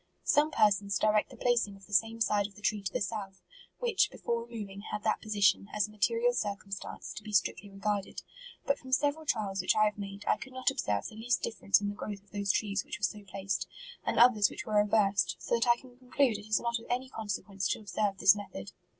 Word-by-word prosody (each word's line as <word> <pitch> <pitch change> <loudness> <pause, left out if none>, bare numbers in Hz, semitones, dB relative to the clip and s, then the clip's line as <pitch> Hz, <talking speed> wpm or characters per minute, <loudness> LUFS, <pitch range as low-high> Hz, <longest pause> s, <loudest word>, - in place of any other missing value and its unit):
"Some 295 +1 +3
persons 200 -7 +2
direct 215 0 +2
the 255 - -13
placing 235 -4 +1
of 195 0 -16
the 205 - -13
same 225 +3 +2
side 205 -2 +2
of 200 - -20
the 210 - -14
tree 210 -1 +1
to 195 -1 -3
the - - -2
south, 195 -2 -4 0.4
which, 475 -4 +2
be - - -12
fore 235 0 -2
removing, 205 -4 -7
had 210 - -3
that 215 - +1
position, 200 -2 +2
as 210 -1 +1
a - - -15
mate 210 -1 +2
rial 470 +1 +2
circumstance, 200 - -4
to - - -7
be 215 - -8
strictly 200 -1 +1
regarded; 195 0 -3 0.4
but, 280 - +1
from 260 - -11
several 295 +3 +1
trials 195 -6 0
which 185 - +2
I 215 0 +5
have 210 -1 -1
made, 200 0 -7
I - - +3
could 265 - -10
not 255 +1 +1
observe 105 - -1
the - - -7
least 235 +3 0
difference 210 -3 +2
in 205 - -1
tbe 205 - -10
growth 205 -2 -6
of 200 - -29
those 200 -1 +1
trees 200 -2 0
which - - -6
were 210 - -18
so 205 +1 -1
pla 195 0 -8
ced, 195 - -1 0.4
and - - -1
others 230 -4 +6
which 210 - -7
were 210 -1 +2
reversed; 195 -4 +2
so - - -4
that 235 0 +2
I 240 0 +5
conclude 250 -2 -1
it 205 - -12
is 215 - +2
not 235 0 -1
of 230 - -13
any 250 +2 -1
consequence 200 -4 -3
to - - -1
observe 205 -1 -1
this 195 +2 +6
method." 195 - -7
210 Hz, 240 wpm, -31 LUFS, 200-230 Hz, 0.4 s, others